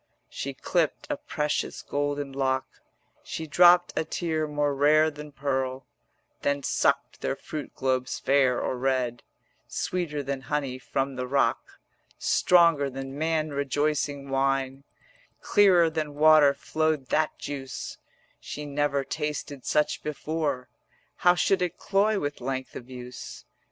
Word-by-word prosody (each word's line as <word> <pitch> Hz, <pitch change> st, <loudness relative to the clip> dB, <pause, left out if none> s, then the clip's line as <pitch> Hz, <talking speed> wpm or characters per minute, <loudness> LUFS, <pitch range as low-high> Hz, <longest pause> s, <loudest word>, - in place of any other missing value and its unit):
She 140 Hz, 0 st, -5 dB
clipped 165 Hz, +3 st, 0 dB
a -, -, +1 dB
precious 150 Hz, -, -2 dB
golden 145 Hz, -1 st, -2 dB
lock, 130 Hz, -1 st, 0 dB, 0.6 s
She 160 Hz, -, -5 dB
dropped 175 Hz, +3 st, +5 dB
a -, -, +1 dB
tear 160 Hz, -1 st, -2 dB
more 145 Hz, -1 st, 0 dB
rare 155 Hz, +3 st, +4 dB
than 150 Hz, 0 st, -10 dB
pearl, 135 Hz, -2 st, -2 dB, 0.6 s
Then 140 Hz, 0 st, 0 dB
sucked 140 Hz, +1 st, 0 dB
their -, -, -1 dB
fruit 150 Hz, 0 st, -7 dB
globes 130 Hz, -1 st, -1 dB
fair 135 Hz, -2 st, +3 dB
or 125 Hz, -, -2 dB
red: 125 Hz, -2 st, 0 dB, 0.5 s
Sweeter 165 Hz, -5 st, -2 dB
than 135 Hz, 0 st, -3 dB
honey 135 Hz, -2 st, -2 dB
from 135 Hz, 0 st, -2 dB
the 125 Hz, 0 st, -3 dB
rock, 135 Hz, +1 st, 0 dB, 0.4 s
Stronger 170 Hz, -5 st, +4 dB
than 135 Hz, +1 st, -6 dB
man 155 Hz, 0 st, 0 dB
rejoicing 140 Hz, 0 st, -1 dB
wine, 135 Hz, 0 st, 0 dB, 0.6 s
130 -, -, -12 dB
Clearer 185 Hz, -5 st, +6 dB
than 155 Hz, -2 st, -3 dB
water 150 Hz, -2 st, +6 dB
flowed 155 Hz, -3 st, -1 dB
that 155 Hz, 0 st, +1 dB
juice; 135 Hz, -3 st, -6 dB, 0.4 s
She 150 Hz, -, -7 dB
never 145 Hz, -1 st, 0 dB
tasted 145 Hz, -1 st, -4 dB
such 150 Hz, -, +1 dB
before, 150 Hz, -3 st, -2 dB, 0.5 s
How 180 Hz, 0 st, +5 dB
should 180 Hz, +2 st, +2 dB
it 180 Hz, -1 st, -1 dB
cloy 205 Hz, +1 st, +2 dB
with 145 Hz, -4 st, -4 dB
length 130 Hz, +1 st, -4 dB
of 125 Hz, -, -8 dB
use? 125 Hz, -1 st, -9 dB
145 Hz, 135 wpm, -27 LUFS, 135-155 Hz, 0.6 s, Clearer